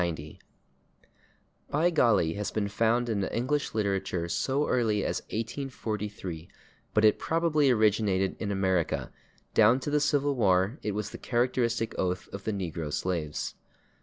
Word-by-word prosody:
/By 170 +4 +2
golly/ 105 - +3
has 105 +2 -3
been 105 -2 -2
found 115 +3 +1
in 105 -4 0
English 135 +6 -1
literature 95 -5 -1
so 135 - 0
early 110 -5 +1
as - - -1
1843, 105 - -4 0.5
but 110 0 +5
it 105 - +5
probably 160 -3 +2
originated 105 -4 +2
in 105 -2 -2
America; 95 -4 0 0.4
down 115 +4 +5
to 145 - -3
the 150 - +3
Civil 145 -1 +2
War 100 - +2
it 105 - -2
was 105 +1 -3
the - - -8
characteristic 120 -2 0
oath 90 0 -1
of 100 0 -7
the 110 - 0
negro 85 -6 -4
slaves. 80 -3 -2
110 Hz, 135 wpm, -28 LUFS, 95-125 Hz, 0.5 s, but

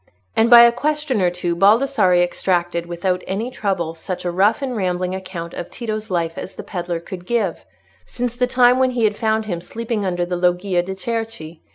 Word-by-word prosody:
And 225 +1 +3
by 240 -1 +10
a 235 - +7
question 295 -2 -1
or 180 - +3
two 175 -1 -2
Baldassarre 200 -2 +4
extracted, 175 -1 -1
without 180 +1 -1
any 220 +6 -3
trouble, 185 -8 -2
such 180 +3 -6
a 175 - 0
rough 205 +8 +2
and 255 -2 -2
rambling 180 -2 -1
account 185 -3 -6
of 175 - -6
Tito's 215 -3 -5
life 165 -3 -1
as - - -8
the - - -7
pedlar 175 -2 -4
could 175 +1 -9
give, 205 -3 -1 0.4
since 245 -1 -4
the 250 0 +1
time 250 0 +4
when 260 0 +3
he 235 - +1
had 210 -1 +2
found 220 0 0
him 175 -5 -4
sleeping 225 +3 -4
under 175 -2 -1
the 180 0 -3
Loggia 180 +1 +1
de' 190 +2 -6
Cerchi. 220 -7 -5
190 Hz, 200 wpm, -20 LUFS, 175-230 Hz, 0.4 s, by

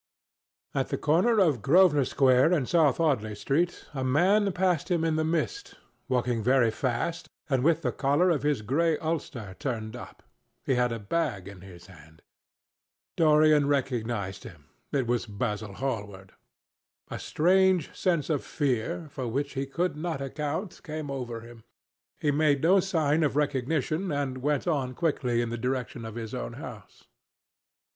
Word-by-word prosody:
At - - -1
the - - -1
corner 185 +10 +2
of 155 - +3
Grosvenor 150 - +5
Square 130 +5 +4
and 140 -8 +1
South 160 -6 +3
Audley 115 -10 +1
Street, 165 - -1
a 135 -2 -3
man 190 +10 +3
passed 180 -3 0
him 170 -2 +1
in 160 -1 +1
the 155 - +1
mist, 170 - -2 0.3
walking 125 -2 0
very 125 0 +3
fast 150 +8 -2 0.2
and 135 -4 +1
with 165 +1 +2
the - - +1
collar 145 +6 +2
of 155 - 0
his 145 -7 0
grey 155 +7 +1
ulster 140 - -4
turned 115 -5 -4
up. 120 - -11 0.4
He - - +2
had 125 -1 +1
a 115 - -2
bag 100 - -2
in 100 -2 -11
his 90 -2 -13
hand. 80 -4 -17 0.9
Dorian 155 -2 +4
recognized 115 -8 -2
him. 75 -5 -13 0.2
It 135 -4 0
was 120 0 -1
Basil 105 -1 -3
Hallward. 105 -6 -5 0.8
A - - -4
strange 185 0 +2
sense 170 -5 0
of 145 - 0
fear, 145 +4 -2
for 130 -3 -4
which 140 +5 -2
he 135 0 -3
could 175 +6 -1
not 160 -1 -3
account, 150 +7 -4
came 155 -3 -5
over 120 -4 -5
him. 115 -1 -13 0.6
He 145 - +1
made 145 -1 +2
no 185 +4 +5
sign 160 -5 +1
of 145 -4 +1
recognition 150 +5 0
and 140 -3 -2
went 145 +1 0
on 135 -6 -1
quickly 130 -7 0
in 115 - -4
the 120 - -4
direction 125 -2 -3
of 110 -1 -7
his 115 -2 -6
own - - -4
house. - - -10
140 Hz, 160 wpm, -27 LUFS, 120-160 Hz, 0.9 s, Grosvenor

